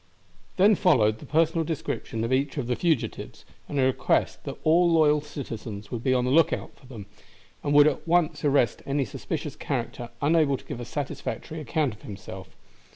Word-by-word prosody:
Then 200 +3 +6
followed 115 - +3
the - - -11
personal 165 +2 +2
description 145 -7 -4
of 115 +3 0
each 135 +2 0
of 135 - -1
the 125 +1 0
fugitives, 160 -5 -2 0.2
and 145 - -1
a - - +4
request 130 0 +1
that - - -5
all 170 +2 +4
loyal 150 -2 +4
citizens 115 -8 -7
would 120 -2 -4
be 130 - +2
on 125 -1 +2
the 125 - 0
look 165 +4 +5
out - - -4
for 130 - -19
them, 115 -6 -9 0.6
and 145 - -1
would 145 0 +8
at 155 - 0
once 170 -2 +2
arrest 140 -6 +2
any 140 0 0
suspicious 105 - -5
character 120 -1 -4
unable 145 -2 +3
to - - -17
give - - -6
a 120 - -5
satisfactory 150 +3 -5
account 145 -2 -1
of 105 - -16
himself. 95 -2 -9
140 Hz, 190 wpm, -26 LUFS, 120-155 Hz, 0.6 s, would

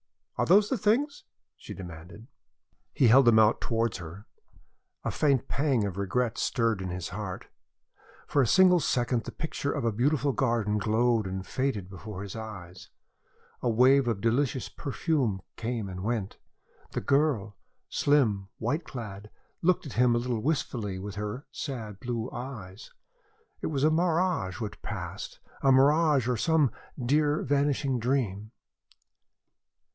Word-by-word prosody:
"Are - - +1
those 205 +4 +5
the 265 - 0
things?" 265 +8 +1 0.3
she - - -10
demanded. 90 +3 -10 0.7
He 130 -5 +3
held 135 +3 +7
them 115 -2 +6
out 110 0 +4
towards 115 -1 0
her. 90 +4 -9 0.8
A - - -1
faint 140 -5 +1
pang 135 -6 +1
of 100 -3 -3
regret 115 +4 -1
stirred 115 -4 +1
his 90 -1 -4
heart. 95 -1 -5 0.8
For 140 - +2
a 125 - +2
single 185 - +6
second 120 -5 0
the - - -5
picture 150 -3 -3
of - - -2
a 115 - +2
beautiful 140 +6 +1
garden 115 -6 0
glowed 110 0 +2
and 95 0 -4
faded 130 -5 -2
before 95 +1 -8
his 100 0 -7
eyes. 95 -6 -9 0.7
A 120 - +1
wave 130 +3 +5
of 110 -4 -1
delicious 125 +3 +1
perfume 135 - -1
came 115 -2 -3
and 90 -1 -6
went. 110 -3 -2 0.5
The - - -2
girl 130 -5 +1 0.3
slim, 115 -10 +2
white 150 +9 -2
clad 105 -4 -8 0.3
looked 180 -1 +2
at 140 - -7
him 120 0 +3
a - - +3
little 120 -2 -2
wistfully 125 -9 -2
with 100 +2 -6
her 105 +7 -5
sad 110 -8 -6
blue 120 0 -3
eyes. 110 -6 -8 0.7
It - - -2
was 145 -3 -1
a 155 - +5
mirage 165 - +1
which 110 -3 -6
passed, - - -6 0.2
a 135 - +4
mirage 145 0 +4
or 125 -2 +1
some 155 0 +3 0.3
dear, 145 +4 +2
vanishing 140 -2 +1
dream. 110 -5 -1
120 Hz, 145 wpm, -28 LUFS, 105-140 Hz, 0.8 s, held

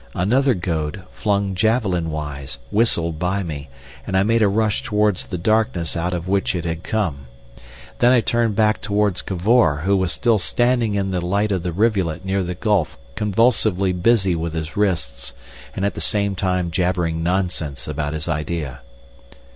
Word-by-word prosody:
Another 125 +8 +2
goad, 85 0 -3
flung 100 -2 0
javelin 95 -4 +1
wise, 70 -5 -5
whistled 85 -8 +1
by 95 +3 0
me, 75 -3 -6 0.4
and 95 - 0
I 95 - +4
made 115 +2 +2
a 105 - +5
rush 105 +1 +1
towards 105 -2 0
the 90 - -4
darkness 95 -3 0
out 85 +1 -1
of 90 0 -3
which 95 0 +1
it 85 -1 -3
had 80 0 -3
come. 85 -12 -2 0.7
Then 120 - +5
I 125 -2 +5
turned 115 -2 +1
back 110 0 +2
towards 105 -2 +1
Cavor, 95 -5 +2
who 100 +1 +3
was 95 -2 +1
still 115 -4 +2
standing 120 +1 +1
in 95 -1 -1
the 90 -2 -1
light 100 +4 0
of 95 -3 0
the 90 0 -3
rivulet 95 -4 0
near 95 +1 0
the 90 0 -3
gulf 100 -4 0 0.2
convulsively 105 - +2
busy 95 +1 +2
with 80 0 -3
his 80 -1 -4
wrists, 80 -10 -1 0.4
and 95 - -1
at 100 - 0
the - - -6
same 100 -1 +1
time 90 -2 -1
jabbering 85 -2 0
nonsense 85 -5 -2
about 75 0 -3
his 80 0 -4
idea. 75 -2 -3
95 Hz, 170 wpm, -21 LUFS, 85-105 Hz, 0.7 s, a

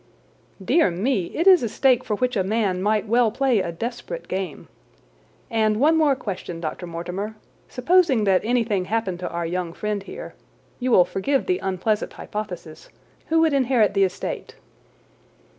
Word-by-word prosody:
"Dear 315 - +4
me! 195 +3 0
It 330 - -3
is 375 -3 +7
a 235 - -1
stake 255 +2 +2
for 210 - -2
which 250 +3 -1
a 195 - +1
man 195 -2 0
might 210 +1 +1
well 235 +1 +3
play 255 0 +1
a 170 -3 -2
desperate 240 - -6
game. 190 0 -4 0.8
And 215 -1 +1
one 310 +5 +4
more 305 -4 +3
question, 185 -7 -6
Dr. 165 +2 -5
Mortimer. 180 +6 -5 0.3
Supposing 315 -4 +3
that 190 -2 +3
anything 225 -5 0
happened 195 -3 -2
to 180 - -4
our 170 0 -3
young 175 0 -3
friend 210 +2 -3
here—you 255 - -9
will 180 -7 +6
forgive 265 +10 -1
the 365 0 0
unpleasant 195 +3 -1
hypothesis!—who 210 - -6
would 320 -2 +3
inherit 255 -5 +3
the 195 -1 +3
estate?" 185 -1 -3
215 Hz, 155 wpm, -23 LUFS, 185-255 Hz, 0.8 s, is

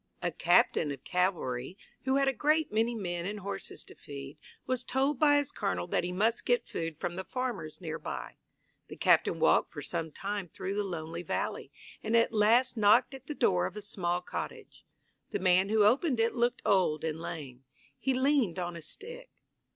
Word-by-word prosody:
A - - +1
captain 145 - +3
of 135 -1 -7
cavalry, 180 -5 -1 0.3
who 265 0 +2
had 275 0 +3
a 270 - +3
great 305 +4 +2
many 225 +2 +1
men 175 -4 -3
and 205 0 -5
horses 200 +2 -5
to - - -13
feed, 140 +1 -9 0.3
was 255 -1 -1
told 270 +2 0
by 290 -1 +6
his 285 -2 0
colonel 90 -1 -2
that - - 0
he 180 - -2
must 215 +6 +1
get 245 -1 +2
food 165 -2 -4
from - - -2
the 190 +2 -5
farmers 225 -11 -4
near 165 -4 -5
by. - - -6 0.5
The - - -9
captain - - +3
walked - - +3
for - - -7
some 160 -1 -3
time 200 +2 -4
through 190 +3 -4
the 205 +1 0
lonely 170 -3 -5
valley, - - -3 0.3
and 225 +2 +2
at 230 0 +3
last 230 +5 +4
knocked 210 +4 +4
at 270 0 -11
the 300 - -4
door 90 - +2
of - - -10
a - - -5
small 175 -3 -1
cottage. - - -7 0.4
The - - -1
man 185 +1 +3
who 215 -1 +4
opened 255 +4 +3
it 225 +1 +2
looked 240 0 0
old 180 -6 +2
and 160 0 -2
lame. 135 -6 -7 0.3
He 265 -1 0
leaned 260 - +2
on 175 -1 -3
a 170 - -7
stick. 485 - -8
200 Hz, 195 wpm, -30 LUFS, 170-245 Hz, 0.5 s, by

